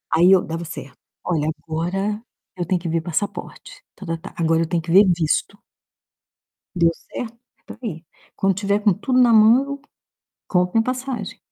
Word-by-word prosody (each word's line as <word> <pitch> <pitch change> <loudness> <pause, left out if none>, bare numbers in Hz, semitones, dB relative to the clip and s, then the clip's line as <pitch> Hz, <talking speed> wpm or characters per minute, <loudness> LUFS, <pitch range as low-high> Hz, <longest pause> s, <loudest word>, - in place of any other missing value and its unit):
Aí 175 +3 +6
eu 190 - +6
dava 165 +1 -5
certo. 145 -4 -9 0.3
"Olha, 155 -3 0
agora 190 +6 -2 0.4
eu 175 - -2
tenho 180 0 0
que 170 - -4
ver 165 0 0
passaporte", 195 +5 -5
ta-ta-ta. 165 -2 -6
"Agora 165 -1 +2
eu 165 - 0
tenho 170 -1 0
que 165 - -5
ver 195 +4 +8
visto". 175 +3 0 1.2
Deu 170 -1 +4 0.2
certo? 235 -1 -6 0.2
É - - -39
pra - - -10
ir. 170 -7 -5 0.3
Quando 195 -1 +1
tiver 200 +1 0
com 205 -2 +3
tudo 255 +6 0
na 245 -2 +6
mão, 255 +6 +4 0.7
compro 180 -1 +1
minha 225 0 +3
passagem. 255 +1 -4
185 Hz, 165 wpm, -21 LUFS, 165-215 Hz, 1.2 s, ver